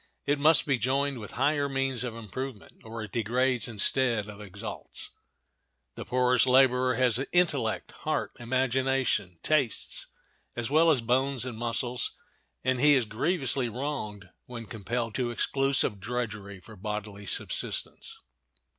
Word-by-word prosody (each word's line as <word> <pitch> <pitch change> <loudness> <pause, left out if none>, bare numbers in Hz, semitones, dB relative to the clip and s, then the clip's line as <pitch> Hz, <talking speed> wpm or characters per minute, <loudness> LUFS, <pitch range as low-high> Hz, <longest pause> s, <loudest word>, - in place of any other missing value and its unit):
It 145 0 +1
must 155 +2 +5
be 140 -4 +1
joined 135 +1 +1
with 105 - -8
higher 140 +3 +1
means 135 -2 -1
of 120 -3 -4
improvement, 115 +1 -7
or 115 0 -6
it 105 - -8
degrades 125 +2 +1
instead 115 0 +2
of 105 0 -9
exalts. 105 +2 -6 0.8
The - - -7
poorest 125 0 +3
laborer 130 0 +5
has 125 0 +3
intellect, 180 -1 +1
heart, - - -2
imagination, 130 -5 0
tastes, 140 -8 0 0.5
as 120 +2 -3
well 160 +2 +5
as 140 -6 +4
bones 130 +2 +1
and 125 -3 -5
muscles, 120 +2 -1 0.5
and 130 -1 +1
he 145 +2 +6
is 130 -3 +2
grievously 130 +2 0
wronged 105 - -4 0.2
when 120 -2 -7
compelled 115 +2 -3
to 125 0 -1
exclusive 135 -2 +1
drudgery 105 -3 -4
for 90 - -13
bodily 105 0 -5
subsistence. - - 0
125 Hz, 135 wpm, -28 LUFS, 110-135 Hz, 0.8 s, he